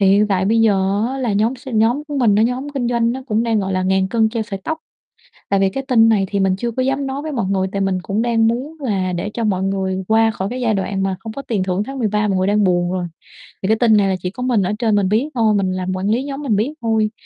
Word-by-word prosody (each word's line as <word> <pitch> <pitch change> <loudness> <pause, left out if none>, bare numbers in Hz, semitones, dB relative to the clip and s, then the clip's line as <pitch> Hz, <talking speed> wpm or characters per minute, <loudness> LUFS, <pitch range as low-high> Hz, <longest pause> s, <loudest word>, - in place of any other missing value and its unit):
thì 195 - +4
hiện 205 +2 +4
tại 190 -1 +1
bây 225 +3 +2
giờ 200 0 +2
á 270 +1 -4
là 240 -5 -1
nhóm 220 +6 +1
s 265 +2 -12
nhóm 235 +5 +2
của 290 - -4
mình 220 -5 +4
nó 215 - +4
nhóm 250 +4 -1
kinh 265 -4 -2
doanh 235 -1 +1
nó 265 +1 -6
cũng 220 -1 +1
đang, 225 -3 +1
gọi 190 0 -2
là, 185 - 0
ngàn 190 0 +1
cân 220 -1 +2
treo 225 0 -2
sợi 200 -3 -6
tóc. 320 0 -2 0.7
Tại 195 -1 +2
vì 195 - +3
cái 270 +5 -4
tin 225 -3 +5
này 200 -4 +2
thì 200 -1 0
mình 190 -1 +2
chưa 235 +3 -2
có 255 +3 -2
dám 270 +1 -1
nói 270 +2 -4
với 310 - -5
mọi 230 -8 -1
người, 190 -1 0
tại 200 - -2
mình 195 -1 0
cũng 205 +4 -1
đang 225 -2 +2
muốn 265 +7 -3
là 195 -8 -1
để 180 +4 -3
cho 230 - -2
mọi 190 -3 0
người 190 -1 -1
qua 225 0 +4
khỏi 195 -3 -4
cái 255 +1 -4
giai 225 -3 +1
đoạn 195 0 -2
mà 190 -1 -1
không 220 +1 -7
có 275 +5 -6
tiền 210 -8 -1
thưởng 185 +2 -1
tháng 270 +2 -7
13 210 -2 0
mọi 190 -2 +1
người 185 - +1
đang 205 +1 +2
buồn 175 -1 +1
rồi. 180 -1 -2 0.6
Thì - - 0
cái 220 0 +3
tin 220 -3 +4
này 200 - +3
là 190 - +1
chỉ 180 - -2
có 250 - -6
mình 235 -6 +2
ở 185 - -1
trên 220 -3 +2
mình 195 -2 +2
biết 230 +8 +1
thôi, 220 -3 +3
mình 190 -2 +1
làm 185 0 -3
quản 190 +2 -2
lý 240 +5 +1
nhóm 280 0 -5
mình 225 -7 +1
biết 235 +9 0
thôi. 220 -2 +1
215 Hz, 305 wpm, -19 LUFS, 195-240 Hz, 0.7 s, tin